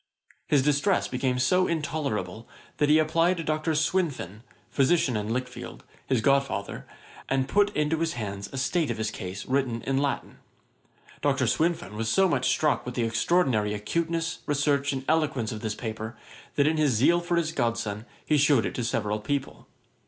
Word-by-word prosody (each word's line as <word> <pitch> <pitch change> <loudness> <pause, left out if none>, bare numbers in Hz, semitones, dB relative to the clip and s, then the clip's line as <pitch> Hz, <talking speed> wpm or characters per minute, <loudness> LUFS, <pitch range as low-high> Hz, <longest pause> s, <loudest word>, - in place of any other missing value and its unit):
His 140 -3 +3
distress 150 +7 +2
became 125 0 -1
so 180 +9 +3
intolerable, 140 - -3 0.3
that 150 - +2
he 155 - +6
applied 165 +3 +2
to 165 - -3
Dr. 155 +1 -1
Swinfen, 150 - -1 0.3
physician 135 -2 +2
in 105 +1 -2
Lichfield, 125 +1 -5 0.2
his 130 -4 +1
god 140 +4 +5
father, 135 -1 -6 0.4
and 135 -1 +1
put 205 +7 +3
into 150 +1 +1
his 165 0 0
hands 100 -3 -5
a 135 - -6
state 155 +3 0
of 120 - -2
his 110 0 -2
case, 95 -1 -6
written 130 -3 -1
in 135 0 0
Latin. 140 0 -2 0.8
Dr. - - +2
Swinfen 160 - 0
was 110 +1 -2
so 190 - +4
much 130 -7 +1
struck 150 -2 +1
with 125 - -6
the 120 - 0
extraordinary 115 -3 +1
acuteness, 165 +9 -2
research, 145 -1 +1
and 135 -1 -4
eloquence 150 -8 +1
of 110 - -6
this 110 -1 -3
paper, 110 0 -6 0.4
that 140 - +3
in 155 +1 +2
his 150 -4 +3
zeal 140 +10 +4
for 175 0 -1
his 165 -2 0
godson 115 -4 -2 0.2
he 150 - +3
shewed 140 -4 +4
it - - -3
to 125 - -3
several 110 -3 -1
people. 135 +5 -4
135 Hz, 175 wpm, -27 LUFS, 115-155 Hz, 0.8 s, he